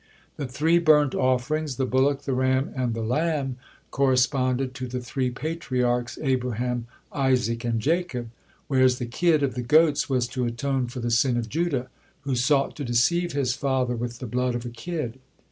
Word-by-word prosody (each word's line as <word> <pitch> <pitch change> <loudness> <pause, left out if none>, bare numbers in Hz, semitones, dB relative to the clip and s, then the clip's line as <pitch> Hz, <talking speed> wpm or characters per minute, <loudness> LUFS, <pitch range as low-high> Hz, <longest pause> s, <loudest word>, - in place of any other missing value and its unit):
The 145 - -3
three 160 +7 +2
burnt 150 -4 +4
offerings, 130 +3 0
the 130 - 0
bullock, 135 +2 +1
the 135 - -2
ram, 130 +1 +1
and 125 -3 -1
the 115 - -3
lamb, 135 +1 -1 0.3
corresponded 130 -1 +1
to 130 -1 -5
the 125 +1 -4
three 125 +1 -2
Patriarchs, 125 -4 -2
Abraham, 125 -2 -1 0.3
Isaac, 130 -4 +1
and 115 -1 0
Jacob, 135 -4 -1 0.4
whereas 130 -2 +3
the 125 - -3
kid 155 +5 +2
of 135 - 0
the 125 - -3
goats 150 +4 +3
was 125 -2 +1
to 125 0 -2
atone 125 +2 -1
for 120 +1 -6
the 120 0 -1
sin 120 +1 +3
of 115 -2 -3
Judah, 150 -5 -1 0.3
who 140 -2 -2
sought 135 +3 +2
to 145 - -4
deceive 165 +8 +1
his 135 -3 +1
father 130 -2 0
with 120 0 -4
the 125 - -7
blood 125 +1 -1
of 120 0 -4
a - - -3
kid. 130 -1 -5
130 Hz, 180 wpm, -25 LUFS, 120-140 Hz, 0.4 s, burnt